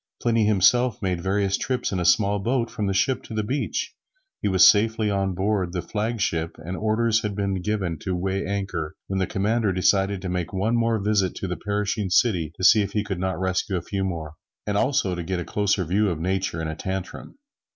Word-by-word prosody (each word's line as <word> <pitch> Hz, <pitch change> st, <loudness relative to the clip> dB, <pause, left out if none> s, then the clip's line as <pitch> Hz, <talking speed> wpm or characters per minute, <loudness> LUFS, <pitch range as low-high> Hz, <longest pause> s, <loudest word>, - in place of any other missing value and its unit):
Pliny 115 Hz, -2 st, +2 dB
himself 110 Hz, +5 st, +3 dB
made 90 Hz, -2 st, -1 dB
various 100 Hz, +1 st, 0 dB
trips 130 Hz, -1 st, -1 dB
in 95 Hz, -, -1 dB
a 90 Hz, -, -1 dB
small 100 Hz, +3 st, +3 dB
boat 115 Hz, +3 st, -1 dB
from 105 Hz, -, -2 dB
the -, -, 0 dB
ship 125 Hz, +6 st, +1 dB
to 110 Hz, -, -9 dB
the 110 Hz, -, 0 dB
beach. 135 Hz, +7 st, -2 dB, 0.5 s
He -, -, 0 dB
was 95 Hz, -1 st, +6 dB
safely 110 Hz, 0 st, +3 dB
on 95 Hz, -2 st, -1 dB
board 95 Hz, -2 st, 0 dB
the 90 Hz, -3 st, -2 dB
flag 110 Hz, +5 st, -2 dB
ship, 80 Hz, -2 st, -1 dB
and 85 Hz, +4 st, -6 dB
orders 110 Hz, +2 st, +1 dB
had 105 Hz, -2 st, -3 dB
been 100 Hz, -2 st, -1 dB
given 95 Hz, -5 st, -2 dB
to 95 Hz, +2 st, -3 dB
weigh 95 Hz, +2 st, -1 dB
anchor, 95 Hz, -6 st, -3 dB
when 95 Hz, 0 st, -2 dB
the 95 Hz, -, 0 dB
commander 105 Hz, +2 st, 0 dB
decided 95 Hz, +1 st, +2 dB
to -, -, -3 dB
make 90 Hz, 0 st, -3 dB
one 105 Hz, +5 st, 0 dB
more 115 Hz, -1 st, +2 dB
visit 100 Hz, -2 st, +1 dB
to 95 Hz, -, -4 dB
the 90 Hz, -, -2 dB
perishing 105 Hz, 0 st, -2 dB
city 90 Hz, -6 st, +2 dB
to -, -, -6 dB
see 105 Hz, +3 st, +7 dB
if 100 Hz, 0 st, -3 dB
he 105 Hz, -, 0 dB
could 95 Hz, -4 st, -4 dB
not 95 Hz, 0 st, -2 dB
rescue 95 Hz, +1 st, -1 dB
a 90 Hz, -, -1 dB
few 100 Hz, +2 st, -3 dB
more, 80 Hz, -5 st, -4 dB, 0.3 s
and 105 Hz, -, -1 dB
also 130 Hz, -4 st, +1 dB
to 90 Hz, -, -3 dB
get 90 Hz, +1 st, -3 dB
a 90 Hz, -, -4 dB
closer 100 Hz, -2 st, 0 dB
view 100 Hz, +5 st, +1 dB
of 85 Hz, -4 st, -3 dB
Nature 95 Hz, -1 st, -1 dB
in 80 Hz, -, -3 dB
a 80 Hz, -, -3 dB
tantrum. 95 Hz, -, -6 dB
95 Hz, 225 wpm, -24 LUFS, 90-105 Hz, 0.5 s, see